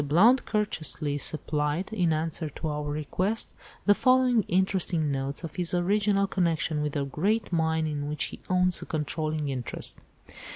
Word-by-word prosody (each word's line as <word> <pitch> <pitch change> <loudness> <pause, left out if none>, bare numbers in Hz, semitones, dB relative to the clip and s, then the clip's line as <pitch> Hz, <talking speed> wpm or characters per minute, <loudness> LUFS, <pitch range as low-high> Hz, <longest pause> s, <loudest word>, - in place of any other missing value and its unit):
Blount 200 - +4
courteously 155 -8 -1
supplied, 150 +6 -1
in 180 -6 +2
answer 160 0 -1
to 155 - -5
our 150 -1 -3
request, 180 +9 -1 0.3
the 205 - +7
following 255 0 +4
interesting 180 -4 +1
notes 135 +3 -3
of 165 0 -7
his 180 0 0
original 200 +2 +2
connection 165 -5 0
with 150 -1 -2
the 140 -2 -1
great 195 - -1
mine 160 -1 +1
in 145 -1 -3
which 150 -1 0
he - - -4
owns 180 -1 +3
a - - -6
controlling 155 -1 -2
interest. 125 -3 -4
160 Hz, 155 wpm, -27 LUFS, 150-190 Hz, 0.3 s, the